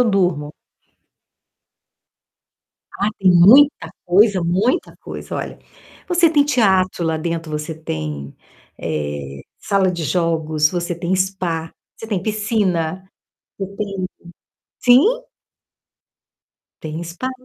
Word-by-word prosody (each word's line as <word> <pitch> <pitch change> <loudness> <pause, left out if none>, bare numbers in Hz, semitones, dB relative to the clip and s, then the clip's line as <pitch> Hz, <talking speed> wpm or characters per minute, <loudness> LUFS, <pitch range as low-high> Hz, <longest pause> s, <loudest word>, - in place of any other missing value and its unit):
eu - - +5
durmo. 175 -7 0 2.5
Ah, 200 - +2
tem 190 -2 +4
muita 185 - +6
coisa, 190 0 +4
muita 195 - 0
coisa. - - -8
Olha: - - -6 0.5
você 345 -2 +4
tem 295 -3 +4
teatro 190 -10 +2
lá 160 -1 0
dentro, 165 0 -4
você 150 +1 -4
tem, 75 - -6 0.4
eh, 75 -3 -4 0.2
sala 195 -2 +1
de 170 -3 -4
jogos, 160 -3 +1
você 175 -1 -2
tem 170 +2 -2
spa, 180 -4 -2 0.2
você 225 - -9
tem 200 -5 -2
piscina, 195 -5 -1 0.6
você 195 0 -5
tem 200 -2 -3 0.8
sim! 430 - +4 1.5
Tem 155 +1 -5
spa. 175 +10 -5
180 Hz, 105 wpm, -19 LUFS, 160-205 Hz, 2.5 s, muita